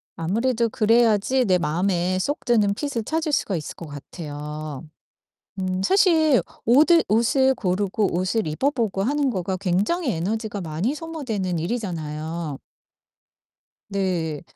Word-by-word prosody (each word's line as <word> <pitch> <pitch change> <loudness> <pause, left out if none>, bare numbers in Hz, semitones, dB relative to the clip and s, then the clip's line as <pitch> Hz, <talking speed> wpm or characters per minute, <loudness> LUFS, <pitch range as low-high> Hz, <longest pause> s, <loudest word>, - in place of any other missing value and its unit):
아무래도 230 +7 0
그래야지 230 +3 +3
내 185 -3 +3
마음에 180 +3 0
쏙 290 +9 -2
드는 215 -5 +3
핏을 270 -3 -3
찾을 315 +5 -1
수가 205 -8 0
있을 155 -3 -5
것 170 - -9
같아요. 150 0 -7 0.7
음 185 0 -1
사실 320 - +4 0.2
오드 310 +8 +6
옷을 260 +5 +3
고르고 195 -1 0
옷을 185 +4 0
입어 155 - +1
보고 220 -8 -1
하는 285 +3 +1
거가 190 -3 -2
굉장히 205 - 0
에너지가 205 +4 -3
많이 175 - -2
소모되는 255 - -3
일이잖아요. 160 - -4 1.3
네. 180 -6 -1
200 Hz, 270 characters per minute, -23 LUFS, 170-250 Hz, 1.3 s, 오드